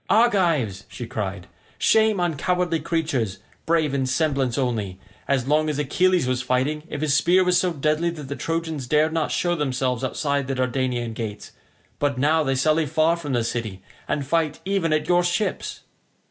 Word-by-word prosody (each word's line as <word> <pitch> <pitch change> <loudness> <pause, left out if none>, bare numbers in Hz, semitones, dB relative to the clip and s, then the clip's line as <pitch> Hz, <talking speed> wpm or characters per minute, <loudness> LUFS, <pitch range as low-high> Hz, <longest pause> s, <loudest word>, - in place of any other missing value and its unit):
"Argives," 170 - +2
she 120 +2 -7
cried; 100 -6 -4 0.3
"shame 220 -2 +3
on 175 -3 0
cowardly 180 +2 0
creatures, 155 - -1 0.3
brave 160 -3 +2
in 135 -2 0
semblance 135 -3 0
only; 110 -8 -2 0.3
as 135 -2 +1
long 155 +1 +2
as 150 - -2
Achilles 175 +4 +2
was 130 0 0
fighting, 130 +4 0
if - - -5
his 155 -2 +1
spear 180 +5 +4
was 180 -1 +3
so 180 -1 +1
deadly 155 +2 0
that 165 -3 -7
the 140 +1 -5
Trojans 160 -5 -3
dared 155 +3 +2
not 160 -2 0
show 175 -1 +1
themselves 130 -5 -1
outside 140 +1 -1
the 135 - -2
Dardanian 125 -2 -1
gates, 110 -2 -6 0.5
but 145 -2 0
now 155 +4 +3
they 135 -3 0
sally 155 +4 +2
far 160 +4 +2
from 150 -5 -5
the 120 -2 +1
city 110 -5 -4 0.2
and 145 - -1
fight 155 +1 0
even 190 -4 0
at 155 0 +1
your 175 0 +4
ships." 175 +4 -2
150 Hz, 175 wpm, -23 LUFS, 130-165 Hz, 0.5 s, spear